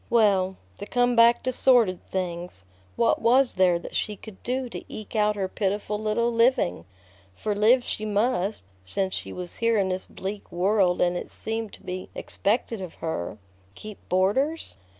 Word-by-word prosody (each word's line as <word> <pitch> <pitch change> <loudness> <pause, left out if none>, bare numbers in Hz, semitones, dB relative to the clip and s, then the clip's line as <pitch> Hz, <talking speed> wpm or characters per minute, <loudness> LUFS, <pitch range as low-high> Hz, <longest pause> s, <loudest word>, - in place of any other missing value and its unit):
Well, 195 -5 +3 0.2
to 205 - -6
come 245 0 +2
back 235 +1 +5
to 255 - 0
sordid 235 -9 +4
things, 175 - -4 0.3
what 235 - +2
was 250 +3 +4
there 180 -2 +3
that 170 - -9
she 210 - -1
could 205 -1 -13
do 255 +1 -2
to - - -7
eke 215 +1 -8
out 210 0 +2
her 195 -2 -1
pitiful 205 +2 -2
little 225 +2 +1
living? 230 - +2 0.5
For 210 - -2
live 225 +5 +4
she 215 - -3
must, 210 - 0 0.2
since 190 - -2
she - - -4
was 180 -1 -6
here 230 -1 +2
in 195 -2 +1
this 185 0 0
bleak 200 +2 -6
world 185 0 +2
and 175 0 +2
it - - -5
seemed 225 -1 -4
to - - -12
be 185 0 -6
expected 220 0 -1
of 180 -3 -7
her. 110 - -4 0.4
Keep 215 -1 -9
boarders? 260 - +1
210 Hz, 170 wpm, -26 LUFS, 185-230 Hz, 0.5 s, back